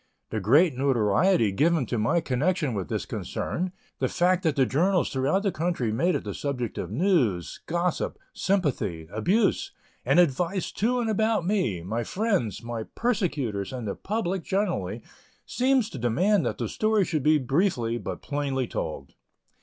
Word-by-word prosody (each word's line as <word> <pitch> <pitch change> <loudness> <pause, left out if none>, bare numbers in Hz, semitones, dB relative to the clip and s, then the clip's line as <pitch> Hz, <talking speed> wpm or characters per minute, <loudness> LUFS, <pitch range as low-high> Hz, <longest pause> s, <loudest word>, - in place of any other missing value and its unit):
The 110 - -1
great 140 - +4
notoriety 125 - +3
given 155 - +2
to 115 +1 -2
my 115 +10 +2
connection 150 +1 0
with 100 -4 -3
this - - -2
concern 180 +1 -3 0.3
the - - +1
fact 180 +1 +2
that 160 -5 +1
the 135 - +4
journals 175 +8 +1
throughout 140 +9 +1
the 200 - +1
country 160 -10 -1
made 170 +10 +1
it 140 - -2
the 100 - -5
subject 125 -4 -3
of - - -4
news, 115 - +1
gossip, 175 +1 -1 0.2
sympathy, 120 - -1
abuse, 195 - +1 0.3
and 135 +7 +3
advice 175 +4 +1
to 245 +4 0
and 230 - -1
about 220 -3 +1
me, 130 - 0
my 110 +6 -2
friends, 195 - -1
my 115 -2 -4
persecutors, 150 - -1
and 125 -4 -5
the 100 - -1
public 195 -4 -2
generally 195 0 -1 0.4
seems 255 -2 +2
to 135 - -6
demand 175 - +2
that - - -3
the - - -2
story 215 -2 +1
should 155 -4 -1
be 155 +3 +4
briefly 130 - 0
but - - -6
plainly 140 -3 -1
told. 70 - -5
150 Hz, 160 wpm, -26 LUFS, 120-190 Hz, 0.4 s, great